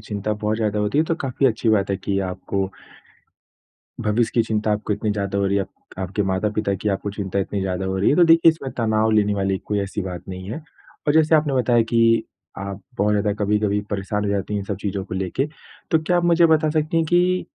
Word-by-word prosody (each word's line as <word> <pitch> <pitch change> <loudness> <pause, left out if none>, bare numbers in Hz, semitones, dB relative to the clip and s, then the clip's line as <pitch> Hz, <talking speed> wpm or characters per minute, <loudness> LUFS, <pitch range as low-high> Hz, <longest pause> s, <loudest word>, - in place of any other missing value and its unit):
चिंता 105 -1 -3
बहुत 105 +1 -1
ज़्यादा 105 -2 -1
होती 105 +8 0
है 160 - +4
तो 165 - 0
काफ़ी 135 +1 +1
अच्छी 115 -2 0
बात 100 -2 +2
है 100 - +1
कि 100 0 -2
आपको 95 +1 -3 1.3
भविष्य 110 +2 +1
की 115 - +4
चिंता 110 0 -1
आपको 105 0 -1
इतनी 105 +1 -1
ज़्यादा 100 -1 -2
हो 100 - +1
रही 100 +1 +1
है, 100 - +2
आपको 95 - -11
आपके 95 +2 -1
माता-पिता 100 +2 0
की 105 +2 -2
आपको 100 +1 -2
चिंता 100 -1 -3
इतनी 100 0 -2
ज़्यादा 95 0 -2
हो 95 0 -2
रही 95 - +3
है, - - +3
तो 175 - +6
देखिए 165 0 +6
इसमें 150 -5 -4
तनाव 110 -1 +2
लेने 105 -1 +3
वाली 95 -1 0
कोई 105 -1 -1
ऐसी 100 +1 -3
बात 90 -2 -6
नहीं 95 +1 -7
है 125 - -4 0.5
और 145 - +4
जैसे 160 0 +5
आपने 150 -2 +1
बताया 120 -2 +3
कि 115 -1 +4 0.3
आप 100 0 -6 0.2
बहुत 105 +1 +2
ज़्यादा 105 0 +1
कभी-कभी 105 0 +1
परेशान 105 +1 -2
हो 100 - 0
जाती 100 +1 -2
हैं 105 - 0
इन - - -8
सब 100 - -3
चीज़ों 100 -1 -2
को 95 - -6
लेके, 95 - -1 0.4
तो 160 - +4
क्या 175 +2 +2
आप 175 - +1
मुझे 170 0 +5
बता 155 -1 +3
सकती 155 +1 0
हैं 165 - +2
कि 180 +1 +2
105 Hz, 235 wpm, -22 LUFS, 100-125 Hz, 1.3 s, तो